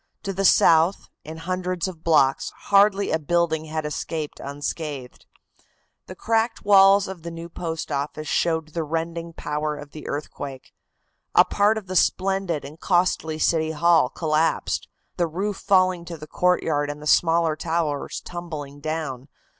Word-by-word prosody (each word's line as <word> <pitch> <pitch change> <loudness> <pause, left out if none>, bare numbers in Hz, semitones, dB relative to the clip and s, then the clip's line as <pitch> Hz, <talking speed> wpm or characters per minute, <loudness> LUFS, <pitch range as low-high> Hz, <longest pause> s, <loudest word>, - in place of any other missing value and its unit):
To 195 - -3
the 195 +1 -1
south, 165 +1 +4
in 160 +1 -8
hundreds 180 +1 -2
of 170 -4 -9
blocks, 145 -5 +3 0.2
hardly 200 0 +4
a 160 - +1
building 160 0 0
had 155 0 -4
escaped 150 0 -4
unscathed. 145 -1 -6 0.8
The 185 - -9
cracked 225 +2 0
walls 195 0 +6
of 190 -3 -8
the 170 - -6
new 165 0 -8
Post 165 -2 -5
Office 145 +2 -3
showed 160 -2 0
the 165 +1 -3
rending 165 +2 -3
power 150 -1 -3
of 145 -1 -10
the 155 - -9
earthquake. 140 -2 -6 0.6
A - - +7
part 210 +2 +2
of 215 - -6
the 185 0 -6
splendid 190 -5 +1
and 150 +3 -11
costly 175 -4 +1
City 160 0 +1
Hall 160 -3 +4
collapsed, 155 +1 0 0.3
the 175 -2 +1
roof 195 +5 -3
falling 185 -2 +2
to 170 -1 -7
the 155 - -9
courtyard 155 -3 +1
and 145 0 -5
the 150 - -10
smaller 165 0 +3
towers 160 -3 -2
tumbling 155 -5 -7
down. 150 -4 -4
165 Hz, 155 wpm, -24 LUFS, 150-180 Hz, 0.8 s, A